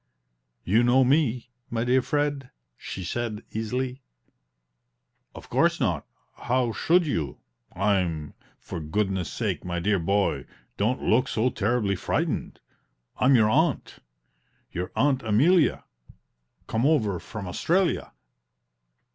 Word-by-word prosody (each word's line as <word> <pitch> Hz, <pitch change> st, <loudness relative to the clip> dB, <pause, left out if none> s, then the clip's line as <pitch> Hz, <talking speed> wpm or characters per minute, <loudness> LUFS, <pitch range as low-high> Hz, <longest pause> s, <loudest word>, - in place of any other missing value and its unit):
"You 105 Hz, +6 st, +3 dB
know 125 Hz, +2 st, +4 dB
me, 130 Hz, -3 st, +1 dB, 0.2 s
my 115 Hz, -1 st, -1 dB
dear 125 Hz, +2 st, +3 dB
Fred?" 145 Hz, -1 st, -1 dB, 0.3 s
she 95 Hz, -, -7 dB
said, 110 Hz, +3 st, -3 dB
easily. 125 Hz, +4 st, -3 dB, 1.3 s
"Of -, -, -11 dB
course -, -, +2 dB
not -, -, -1 dB, 0.3 s
how 125 Hz, -1 st, 0 dB
should 175 Hz, +9 st, +2 dB
you? 80 Hz, -, -2 dB, 0.4 s
I'm 90 Hz, -6 st, 0 dB, 0.3 s
for -, -, -6 dB
goodness 95 Hz, +2 st, -1 dB
sake, -, -, -2 dB
my 85 Hz, -1 st, -3 dB
dear 100 Hz, +2 st, +1 dB
boy, 100 Hz, +4 st, 0 dB, 0.3 s
don't 115 Hz, +6 st, 0 dB
look 120 Hz, +4 st, +3 dB
so 120 Hz, +3 st, 0 dB
terribly 105 Hz, -2 st, 0 dB
frightened! -, -, -2 dB, 0.6 s
I'm 130 Hz, +1 st, +5 dB
your 110 Hz, -2 st, +4 dB
aunt 155 Hz, +2 st, +1 dB, 0.7 s
your 90 Hz, +1 st, -4 dB
aunt 135 Hz, -1 st, +2 dB
Amelia, 145 Hz, -, +3 dB, 0.8 s
come 110 Hz, +2 st, -1 dB
over 115 Hz, -, +2 dB
from 100 Hz, +3 st, -7 dB
Australia!" 175 Hz, -, 0 dB
115 Hz, 115 wpm, -26 LUFS, 100-130 Hz, 1.3 s, I'm